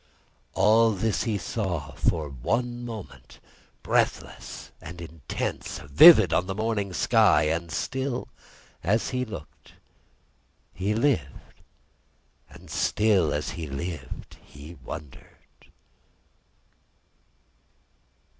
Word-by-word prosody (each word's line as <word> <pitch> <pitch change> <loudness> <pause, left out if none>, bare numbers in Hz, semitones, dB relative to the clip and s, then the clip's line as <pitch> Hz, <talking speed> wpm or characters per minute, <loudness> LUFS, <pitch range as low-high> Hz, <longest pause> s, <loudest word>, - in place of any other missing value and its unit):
All 110 +1 +5
this 100 -2 -1
he 110 -3 0
saw, 90 -8 -3
for 75 +2 0
one 115 - -2
moment 115 -5 -9 0.5
breathless - - -2
and 85 0 -9
intense, 80 -3 -5
vivid 90 - +7
on 90 - +1
the 95 - -3
morning 110 -2 -1
sky; 90 - +4
and 80 +2 -1
still, 130 +8 -3 0.6
as 105 +7 +1
he 125 0 -1
looked, 100 -11 -10 1.0
he 100 +4 -1
lived; 115 - -1 0.9
and - - -14
still, 100 -8 +2
as 75 - -2
he 80 -3 -6
lived, 75 +4 -6
he 70 +3 -12
wondered. 70 -1 -12
95 Hz, 95 wpm, -26 LUFS, 80-110 Hz, 1.0 s, vivid